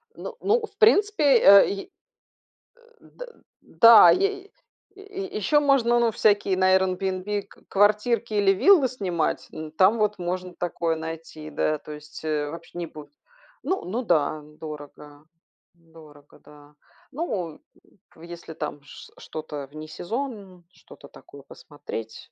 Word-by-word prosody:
Ну 470 - -8
ну, 440 +2 +1
в - - -29
принципе, 420 -6 +3
э, 200 -2 +7
й 195 0 -6 0.9
Э, - - -25 0.3
д - - -10 0.4
да. 230 -1 +7
Ей 395 +1 -1 0.4
е 395 -1 -8
еще 215 +9 +2
можно, 250 -4 +2
ну, 235 -1 +2
всякие 205 -3 +2
на 185 0 +4
Airbnb 190 +2 -2
кв - - -22
квартирки 215 +3 +1
или 200 -1 +3
виллы 315 - +5
снимать. 180 -10 -3
Ну, 155 -1 -8
там 190 +7 +3
вот 210 -1 0
можно 180 +1 -4
такое 170 -1 -2
найти, 160 -1 -8
да. 155 +1 -1
То 150 - -12
есть, 150 +1 -12
э, 150 -1 -2
вообще 170 +1 -11
не 170 - -3
будет. 150 - -13 0.5
Н - - -3 0.2
ну 240 +3 -2
да, 155 -5 0
дорого. 150 -1 -11 0.5
Дорого, 160 -3 -19
да. 145 0 -19 0.4
Ну, 190 - -4
э, - - -21 0.6
в 160 - -18
если 170 -1 -10
там 150 -2 -6
ш 145 - -14
что-то 150 -3 -8
в - - -18
несезон, 190 - -6
что-то 140 - -16
такое 140 0 -15
посмотреть. 115 -7 -10
185 Hz, 145 wpm, -24 LUFS, 155-230 Hz, 0.9 s, э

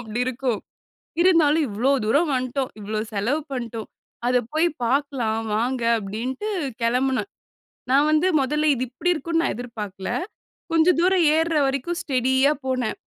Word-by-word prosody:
அப்டி - - 0
இருக்கும், 255 -3 -1 0.6
இருந்தாலும், 325 -4 +4
"இவ்ளோ 230 +7 +1
தூரம் 290 +9 +2
வண்ட்டோம், 255 +1 -1
இவ்ளோ 210 +1 -3
செலவு 225 +9 0
பண்டோம். 230 -3 -5 0.4
அத 250 0 +3
போயி 315 +3 +3 0.2
பார்க்கலாம் 250 -4 0 0.2
வாங்க." 240 +2 -1 0.2
அப்டின்ட்டு 235 - -4 0.3
கெளம்புனேன். 255 +8 +1 0.6
நான் 285 +3 +4
வந்து 310 +3 +3
மொதல்ல 300 +3 +1
இது 255 0 -2
இப்டி 265 +9 -1
இருக்கும் 330 +2 -1
நான் - - 0
எதிர்பார்க்கல, 210 -6 -6 0.6
கொஞ்சம் 330 +1 +4
தூரம் 365 0 +3
ஏர்ற 325 +1 +1
வரைக்கும் 275 +6 -2
ஸ்டெடியா 265 +1 +2
போனேன். 255 -3 -1
260 Hz, 135 wpm, -23 LUFS, 235-310 Hz, 0.6 s, இருந்தாலும்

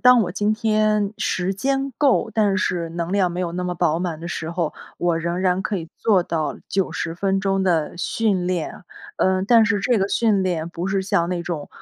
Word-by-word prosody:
当 250 -1 +7
我 180 - -3
今 210 +2 +1
天 215 -2 +1
时 185 +1 0
间 270 +6 -1
够， 265 -5 +3
但 205 -3 +2
是 175 -3 -1
能 170 +2 -3
量 190 -3 +2
没 175 - -4
有 175 -2 -2
那 180 +1 -3
么 180 0 -2
饱 160 -1 +1
满 170 -3 -3
的 170 - -6
时 160 -1 -4
候， 170 -2 -1 0.2
我 170 -1 +1
仍 170 +2 -2
然 185 0 +2
可 195 +1 -2
以 165 -3 -6
做 200 -5 +3
到 160 -3 -2
90 180 -3 -1
分 195 +2 0
钟 195 0 +1
的 165 -5 +1
训 195 -2 0
练。 180 -1 -3 0.3
呃， 185 0 +2
但 230 0 +6
是 205 -2 +1
这 240 +2 +2
个 195 0 0
训 210 -3 +2
练 170 -3 -1
不 170 +1 -4
是 195 0 0
像 170 -3 +1
那 175 -1 -2
种， 170 -4 -4
185 Hz, 225 characters per minute, -22 LUFS, 170-205 Hz, 0.3 s, 当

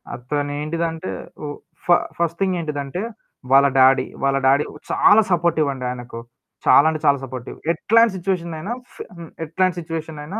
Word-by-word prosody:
అతనేంటిదంటే 150 - -3 0.4
ఓహ్! 145 0 -6 0.3
ఫ - - -18 0.3
first 170 0 -1
thing 190 -1 +1
ఏంటిదంటే 150 +1 -4 0.5
వాళ్ళ 140 +1 +7
డాడీ. 130 +1 +5 0.2
వాళ్ళ 135 0 +2
డాడీ 140 +2 +4 0.3
చాలా 220 +2 +6
సపోర్టివండి 155 -6 +1
ఆయనకు. 120 -1 -7 0.5
చాలా 145 - +6
అంటే 155 -1 -3
చాలా 140 -1 +5
సపోర్టివ్. 130 -1 -8 0.2
ఎట్లాంటి 225 +6 +3
సిట్యుయేషన్‌నైనా 175 0 -3 0.2
ఫ్ - - -19 0.2
హ్మ్. 165 -1 -9 0.2
ఎట్లాంటి 180 +3 0
సిట్యుయేషన్‌నైనా 160 +2 -6
155 Hz, 135 wpm, -21 LUFS, 140-170 Hz, 0.5 s, వాళ్ళ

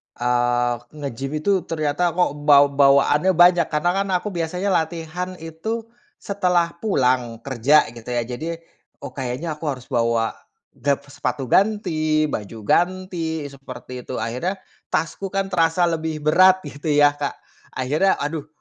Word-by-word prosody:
eee, 120 0 +1 0.2
ngegym 140 +2 -5
itu 200 -2 +3
ternyata 160 +2 0
kok 180 -5 +2 0.2
baw 145 -1 +8
bawaannya 140 +5 +4
banyak 175 -1 +5
karena 150 +4 +1
kan 195 +1 -1
aku 205 +3 -2
biasanya 180 +3 -2
latihan 170 +2 -2
itu 170 +8 -5 0.3
setelah 180 -4 0
pulang 125 - 0
kerja 140 +3 +4
gitu 115 -1 -13
ya 120 - +1
jadi, 165 +8 -6 0.4
oh - - -6
kayaknya 135 +5 -4
aku 165 - -7
harus 125 0 -14
bawa, 115 -2 +1 0.4
gab 140 -1 -1
sepatu 145 -1 -4
ganti 160 -7 +2
baju 105 +2 -5
ganti 175 - 0
seperti 125 -2 -9
itu 130 - -4
akhirnya 125 - -2 0.3
tasku 180 +4 -2
kan 195 0 -1
terasa 165 0 +2
lebih 160 -2 -2
berat 185 +4 +5
gitu 145 +1 -8
ya 145 0 +5
Kak, 145 -1 -4 0.4
akhirnya 150 +9 +2
aduh, 150 0 -4
155 Hz, 140 wpm, -22 LUFS, 135-175 Hz, 0.4 s, baw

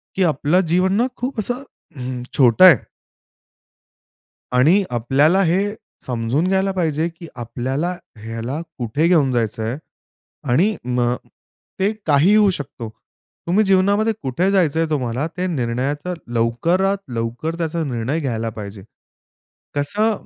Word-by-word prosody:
की 190 - +2
आपलं 150 +6 +2
जीवन 185 +2 +3
ना, 235 +5 +2
खूप 250 -1 -3
असं 245 +5 -2 0.3
हं, 125 -1 -5
छोटं 125 +5 +6
आहे. 180 -5 +10 1.8
आणि 160 +11 +4
आपल्याला 140 +10 +3
हे 195 +4 +1 0.3
समजून 125 +7 0
घ्यायला 190 +1 +1
पाहिजे, 165 -4 0
की 170 0 -12
आपल्याला 130 +8 -3 0.2
ह्याला 115 +7 -5 0.2
कुठे 125 +7 0
घेऊन 155 -7 +3
जायचं 115 -2 -1
आहे 115 +4 -2 0.7
आणि 195 - +3
मग 125 -1 +1 0.6
ते 195 +2 +2
काहीही 155 +7 +4
होऊ 210 -2 +5
शकतो. 135 - -5 0.6
तुम्ही 190 +5 +3
जीवनामध्ये 200 +3 +3
कुठे 140 +9 0
जायचं 165 -6 +2
आहे 165 -1 +1
तुम्हाला, 130 -1 -1
ते 180 +2 -4
निर्णयाचा 145 +3 -2 0.2
लवकरात 165 +13 +1 0.2
लवकर 115 +8 -3
त्याचा 165 0 -2
निर्णय 130 +2 -2
घ्यायला 115 -6 -2
पाहिजे. 100 -2 -8 0.9
कसं, 205 +10 0
155 Hz, 125 wpm, -20 LUFS, 125-185 Hz, 1.8 s, आहे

